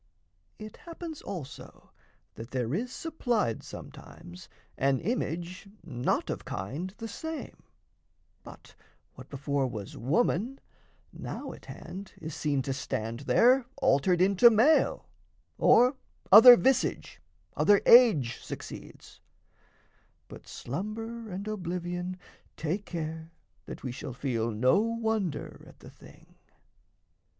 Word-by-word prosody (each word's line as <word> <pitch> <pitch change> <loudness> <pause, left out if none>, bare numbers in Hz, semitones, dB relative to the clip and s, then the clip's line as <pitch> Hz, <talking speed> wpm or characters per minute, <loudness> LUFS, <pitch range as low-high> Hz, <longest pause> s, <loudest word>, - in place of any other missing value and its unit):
It 215 0 -10
happens 335 -2 -9
also 170 -9 -9 0.4
that 115 +2 -9
there 125 -1 -2
is 240 +8 -2
supplied 245 - -1
Sometimes 90 +1 -12 0.3
an 135 -1 +1
image 180 -2 -4
not 125 -7 -1
of - - -5
kind 140 - -5
the 225 -1 -6
same; 320 +8 -7 0.8
But - - -14 0.4
what - - -13
before 140 -1 -1
was 105 -5 -7
woman, 215 - 0 0.5
now - - -6
at - - -15
hand 195 +1 -9
Is 160 -1 -7
seen 140 -3 -1
to 135 - -2
stand 115 -4 -4
there, 250 +1 +4
altered 170 +6 +2
into 200 +5 +6
male; 235 +8 +3 0.5
Or 250 +3 +5 0.4
other 235 +4 +11
visage, 260 +1 0 0.3
other 205 -1 +4
age 215 - +6
succeeds; - - -10 1.1
But - - -13
slumber 220 - -6
and 195 +2 -6
oblivion 180 -2 -4 0.4
take 175 +6 -3
care 160 -1 -5 0.4
That - - -9
we 130 - -3
shall 125 +1 -7
feel 120 -3 -2
no 125 - +3
wonder 220 -8 -2
at - - -17
the - - -12
thing. - - -18
180 Hz, 115 wpm, -29 LUFS, 135-225 Hz, 1.1 s, other